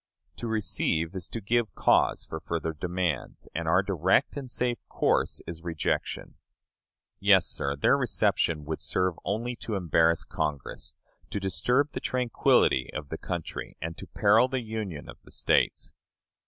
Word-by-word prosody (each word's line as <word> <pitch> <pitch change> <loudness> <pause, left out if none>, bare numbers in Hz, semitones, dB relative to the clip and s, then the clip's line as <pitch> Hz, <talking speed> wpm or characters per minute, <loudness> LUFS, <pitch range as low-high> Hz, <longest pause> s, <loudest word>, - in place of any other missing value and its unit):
To 120 - -4
receive 95 -6 0
is 90 -3 -5
to 115 - -4
give 115 +2 0
cause - - +3
for 80 - -6
further 80 0 -3
demands, 85 -3 -3
and 85 0 -3
our 90 +4 +4
direct 95 -5 +2
and 135 -3 -6
safe 120 -1 -1
course - - +1
is 85 -1 -7
rejection. 80 -3 -2 0.8
Yes, - - +5
sir, 70 0 -1
their 70 - +4
reception 75 -3 +1
would 80 +1 -4
serve 90 -1 +1
only 115 +4 -2
to 110 - -4
embarrass 85 -3 +3
Congress, 75 -4 -4 0.3
to 100 - -2
disturb 125 +9 +1
the - - -4
tranquillity 120 - +2
of 75 -2 -6
the - - -4
country, 85 -3 -5
and 80 +1 -4
to - - -8
peril 110 +4 +4
the 130 -1 -2
Union 110 -9 -5
of - - -11
the - - -18
States. - - +1
90 Hz, 155 wpm, -28 LUFS, 80-110 Hz, 0.8 s, Yes